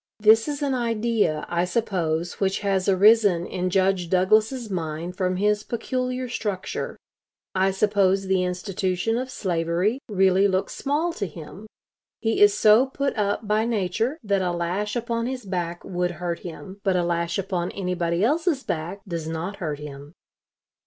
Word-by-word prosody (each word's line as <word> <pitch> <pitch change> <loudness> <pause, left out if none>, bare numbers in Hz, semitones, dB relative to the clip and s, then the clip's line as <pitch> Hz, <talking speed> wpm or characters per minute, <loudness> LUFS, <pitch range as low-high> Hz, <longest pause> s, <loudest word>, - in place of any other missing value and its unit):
This 220 +3 +5
is 290 -1 -3
an 275 -2 +1
idea, 230 -9 0
I 170 0 0
suppose, 175 -4 -1
which 195 0 0
has 195 -2 +1
arisen 200 -2 +5
in 180 0 -2
Judge 185 -2 +1
Douglas's 215 +7 +2
mind 170 -2 -4
from 185 0 0
his 205 +2 +1
peculiar 255 +3 -3
structure. 205 -6 -4 0.6
I 190 0 +2
suppose 195 -1 +2
the 190 -1 +2
institution 185 +3 -1
of 255 +2 -2
slavery 180 +4 0
really 190 -1 +4
looks 190 -1 -1
small 305 +5 -1
to 200 - -3
him. 170 +6 -10 0.5
He 225 -2 0
is 205 0 +6
so 220 +5 +6
put 275 +1 -2
up 210 0 -1
by 215 +1 +2
nature 225 - -1
that 200 -2 +1
a 180 -1 0
lash 180 +5 -2
upon 235 0 -1
his 255 -3 -5
back 175 -2 -3
would 180 -1 -1
hurt 175 -1 -3
him, 190 +3 -9
but 190 -2 +2
a 180 - +2
lash 170 0 -1
upon 185 -2 -2
anybody 180 -2 -1
else's 305 - +1
back 170 +5 -4
does 165 -3 -4
not 165 +5 -4
hurt 155 -7 -3
him.... 145 0 -9
195 Hz, 160 wpm, -24 LUFS, 175-220 Hz, 0.6 s, is